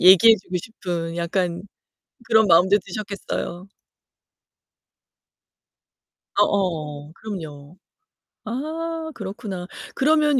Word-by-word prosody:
얘기해 190 +5 +9
주고 185 -1 -4
싶은 175 -4 -4
약간 175 0 -1 0.6
그런 220 -2 +5
마음도 185 +4 +6
드셨겠어요. 195 -2 -4 2.7
어어. 155 -7 +1
그럼요. 160 -6 -8 0.7
아 320 +6 -3
그렇구나. 195 -3 -6 0.3
그러면 300 -1 +4
190 Hz, 185 characters per minute, -23 LUFS, 170-225 Hz, 2.7 s, 얘기해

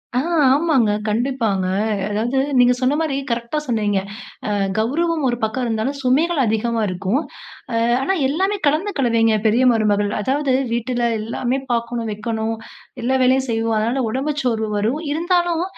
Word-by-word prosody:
ஆ, - - +3 0.3
ஆமாங்க, 275 -6 +3 0.2
கண்டிப்பாங்க. 225 -4 0 0.4
அதாவது 230 +6 -1 0.2
நீங்க 245 0 +6
சொன்ன 260 +2 +2
மாரி, 310 -4 -1 0.2
கரெக்ட்டா 235 +5 -2
சொன்னீங்க. 210 -5 0 0.5
அ - - -1 0.3
கௌரவம் 310 +7 0
ஒரு 240 - -1
பக்கம் 220 +3 -1
இருந்தாலும், 230 +5 -2
சுமைகள் 305 +6 +2
அதிகமா 225 +1 0
இருக்கும். 185 +7 -1 0.5
அ, - - 0 0.3
ஆனா 380 - +1
எல்லாமே 385 +8 0
கலந்த 315 +8 +1
கலவைங்க, 230 -3 +3
பெரிய 230 +4 +3
மருமகள். 205 -2 +1
அதாவது 270 +3 0 0.2
வீட்டுல 240 0 0
எல்லாமே 240 +4 -2
பார்க்கணும், 235 0 -2
வைக்கணும். 220 +1 -3 0.5
எல்லா 260 +2 +2
வேலையும் 260 +1 +3
செய்வோம், 225 0 0
அதனால 240 +5 0
உடம்பு 275 +6 -1
சோர்வு 220 -3 0
வரும். 235 +10 0
இருந்தாலும், 345 +1 +1
240 Hz, 140 wpm, -20 LUFS, 220-275 Hz, 0.5 s, நீங்க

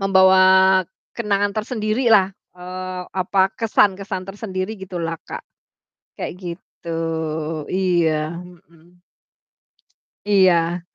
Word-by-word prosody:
membawa 190 -1 +5 0.8
kenangan 205 -3 0
tersendiri 215 +2 -1
lah, 195 -3 +5 0.3
eee, 185 0 -6 0.2
apa, 190 +1 +1 0.2
kesan-kesan 200 -3 +1
tersendiri 195 0 -5
gitu 190 -1 -7
lah 165 0 -3
Kak, - - -7 0.7
kayak - - -4
gitu, 170 -1 -9 0.8
iya, 170 -4 +1
mhm. 175 -1 -18 1.2
Iya. 180 -4 +3
185 Hz, 90 wpm, -21 LUFS, 175-200 Hz, 1.2 s, membawa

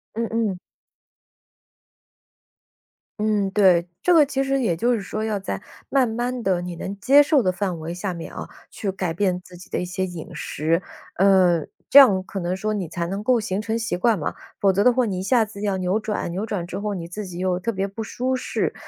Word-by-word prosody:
嗯 230 +1 -1
嗯。 220 -5 0 2.6
嗯， 210 -2 +1
对。 185 -4 +4 0.2
这 360 - +4
个 315 -3 +7
其 270 -1 -1
实 270 0 0
也 205 -9 +1
就 240 +9 +1
是 225 - -1
说 215 +2 -4
要 215 -2 -1
在 195 - -4 0.3
慢 265 -3 +3
慢 240 +2 -2
地， 185 -3 +1
你 175 -1 -5
能 195 +4 -6
接 275 +8 +6
受 295 -2 +3
的 185 - +2
范 185 -2 -3
围 160 +2 -5
下 180 +1 -3
面 170 -1 -8
啊， - - -6 0.2
去 200 - -3
改 185 -3 -3
变 180 0 0
自 180 - -14
己 180 - -14
的 - - -2
一 - - -2
些 185 +1 -2
饮 175 -3 -7
食。 165 +3 -1 0.4
嗯， 185 -4 +4 0.2
这 - - +6
样 220 -10 +8
可 195 +1 -6
能 175 +1 -1
说 215 +2 -1
你 190 -6 -3
才 170 0 -3
能 195 +3 -4
够 245 +1 +3
形 205 -2 -2
成 220 +2 -2
习 225 -5 -2
惯 210 +3 +2
嘛， 150 - -3 0.2
否则的话 205 +6 +3
你 195 -4 -2
一 - - -3
下 230 +2 +3
子 205 -1 -10
要 200 -2 0
扭 185 +2 0
转， 215 -4 -3
扭 190 +5 -3
转 190 -6 -3
之 - - -5
后 205 +1 -2
你 170 -3 -5
自 205 +4 -6
己 180 -2 -8
又 185 -1 0
特 205 +6 -2
别 195 -2 -2
不 200 +3 -6
舒 255 +4 -2
适。 255 - -2
200 Hz, 240 characters per minute, -23 LUFS, 180-225 Hz, 2.6 s, 样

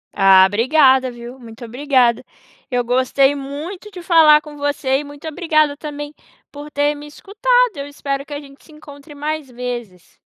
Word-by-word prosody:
Ah, 190 -1 +6
obrigada 260 +5 +3
viu, 240 +2 -11
muito 235 0 -11
obrigada. 250 -1 +1 0.5
Eu 245 -1 0
gostei 260 +3 +2
muito 300 +9 -7
de 360 - -9
falar 315 -4 +6
com 295 -1 -12
você 280 -2 -1
e - - -6
muito 290 +2 -11
obrigada 310 -3 +1
também 295 0 -7 0.4
por 290 +1 -10
ter 290 0 0
me 295 +1 -10
escutado, - - 0
eu 280 0 -5
espero 275 -1 -4
que 295 - -9
a 285 - -4
gente 275 -1 -16
se 315 - -19
encontre 295 -1 -14
mais 300 -1 -4
vezes. 240 -7 -8
285 Hz, 170 wpm, -18 LUFS, 255-300 Hz, 0.5 s, Ah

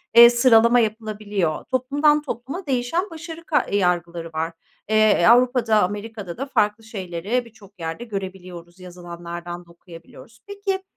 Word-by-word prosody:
eee, 235 0 +11
sıralama 235 0 +5
yapılabiliyor. 210 -6 -2
Toplumdan 285 +4 +2
topluma 285 - -6
değişen 275 +8 -1
başarı 330 0 -9
ka 300 - +1
yargıları 175 -3 0
var. 160 +1 -2 0.4
Eee, 215 0 +4
e, 175 - +4
Avrupa'da, 240 -3 +4
Amerika'da 205 -1 -5
da 270 - -3
farklı 210 -5 0
şeyleri 200 +2 -3
birçok 205 -4 -18
yerde 165 +7 -5
görebiliyoruz, 185 -4 -8
yazılanlardan 175 -1 -8
da 170 - -19
okuyabiliyoruz. 170 -1 -15
Peki, 400 -1 -3
215 Hz, 130 wpm, -22 LUFS, 175-250 Hz, 0.4 s, eee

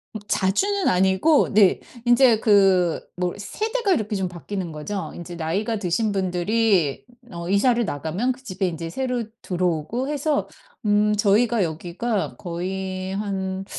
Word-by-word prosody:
음 - - -3
자주는 385 - +1
아니고 190 - +3
네. 200 -2 +5 0.3
인제 240 -2 +5
그 195 -5 +3
뭐 180 0 -2
세대가 435 - -1
이렇게 215 -7 -1
좀 190 -2 -1
바뀌는 175 0 -5
거죠. 170 +6 -5
인제 175 0 -8
나이가 195 +8 -1
드신 205 +3 0
분들이 190 -3 +1 0.3
어 170 0 -6
이사를 235 +4 +3
나가면 170 - -2
그 260 +1 -8
집에 190 -4 -2
인제 165 -1 -4
새로 250 +3 -2 0.2
들어오고 180 - -1
해서 295 0 0 0.4
음 210 +1 +3
저희가 210 +2 +3
여기가 180 +7 -3
거의 185 +1 -4
한 190 -2 -3
195 Hz, 280 characters per minute, -23 LUFS, 180-230 Hz, 0.4 s, 네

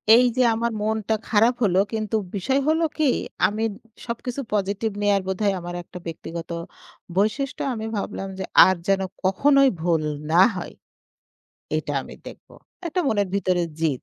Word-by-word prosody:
এই 250 +1 +6
যে - - +4
আমার 235 +1 -1
মনটা 220 0 0
খারাপ 225 +3 +4
হলো 190 -2 +3
কিন্তু 215 0 -2 0.2
বিষয় 265 +8 +1
হলো 320 +1 +3
কি 310 - +1 0.4
আমি 215 +2 -3
উম - - -12 0.3
সবকিছু 245 +3 -4
পজিটিভ 205 +2 0
নেয়ার 200 -1 +3
বোধহয় 195 +1 +1
আমার 175 0 -6
একটা 180 - -11
ব্যক্তিগত 165 +1 -6 0.7
বৈশিষ্ট্য 220 +8 0
আমি 220 -1 -4
ভাবলাম 195 -1 -4
যে, - - -2 0.2
"আর 190 - +3
যেন 195 -1 +3 0.2
কখনোই 275 +8 +4
ভুল 165 -2 +1 0.3
না 175 +3 +6
হয়। 175 - -6 1.0
এটা - - -3
আমি - - -11
দেখব।" - - -11 0.4
এটা 360 +2 -1
মনের 205 -3 +1
ভিতরে 185 -3 +1 0.2
জিদ। 150 -6 0
205 Hz, 155 wpm, -23 LUFS, 185-235 Hz, 1.0 s, এই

